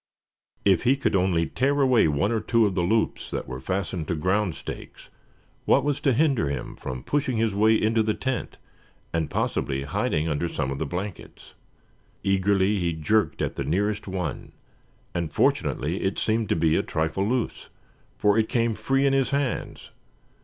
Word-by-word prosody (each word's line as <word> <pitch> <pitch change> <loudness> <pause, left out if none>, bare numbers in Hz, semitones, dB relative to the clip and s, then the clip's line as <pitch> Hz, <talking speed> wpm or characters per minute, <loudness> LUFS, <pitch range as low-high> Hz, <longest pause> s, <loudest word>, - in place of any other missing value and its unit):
If 95 -3 +4
he 130 +3 +3
could 135 - 0
only 90 -3 +2
tear 140 - 0
away 130 -8 +4
one 75 +8 +1
or 115 - +1
two 115 +1 +2
of 100 - 0
the 90 - 0
loops 110 +6 0
that - - -4
were 65 0 -6
fastened 90 0 -3
to 85 - -1
ground 95 +3 0
stakes, - - -9 0.6
what 135 - +4
was 145 -1 0
to 135 - +2
hinder 135 - +2
him 70 - -4
from 65 -1 -6
pushing 130 -4 0
his 110 -2 +1
way 110 +2 +4
into 110 +1 +2
the 110 -1 0
tent, 130 -2 -3 0.6
and 80 -2 0
possibly 70 0 -1
hiding 75 +2 -1
under 80 +2 -1
some 70 -4 -2
of 70 - -4
the 80 - -2
blankets? 90 +5 -7 0.7
Eagerly 95 +1 +2
he 85 -2 0
jerked 105 +7 +1
at - - -3
the 70 - -1
nearest 100 +9 -1
one; 90 -7 -4 0.6
and 85 -3 -2
fortunately 80 +4 0
it 95 +1 -1
seemed 110 -1 0
to - - +2
be 80 -1 +2
a - - +3
trifle 80 +5 -1
loose, 125 -2 -2 0.5
for 105 +1 +3
it 110 - +1
came 115 -3 +1
free 135 +5 +1
in 135 - +3
his 135 -1 +2
hands. 140 -2 -2
100 Hz, 180 wpm, -25 LUFS, 85-115 Hz, 0.7 s, If